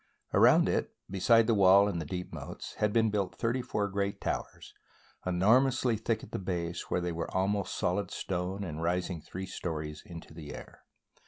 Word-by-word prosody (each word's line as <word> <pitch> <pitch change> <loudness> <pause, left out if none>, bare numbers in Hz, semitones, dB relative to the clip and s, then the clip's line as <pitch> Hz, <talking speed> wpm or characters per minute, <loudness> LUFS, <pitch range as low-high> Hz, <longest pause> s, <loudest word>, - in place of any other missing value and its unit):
Around - - +6
it, - - -1 0.2
besides 115 +4 +4
the 115 - +3
wall 100 0 +6
and 90 -5 -2
the 75 - -6
deep 90 +2 -5
moats, - - -7
had 105 -1 +2
been 110 -1 +3
built 100 -3 -1
thirty 120 +3 0
four 105 -4 -1
great 100 0 -2
towers, - - -4 0.5
enormously 120 +7 +3
thick 110 +1 -1
at - - -11
the - - -3
base, 85 -2 -3
where 90 - 0
they 85 0 -2
were 85 0 -3
almost 100 +1 0
solid 90 +1 0
stone, 95 +2 -3
and 80 -4 -5
rising 90 0 -1
three 95 +5 -6
stories 75 -4 -5
into 85 -2 -10
the 75 -2 -8
air. - - -12
95 Hz, 180 wpm, -30 LUFS, 85-105 Hz, 0.5 s, Around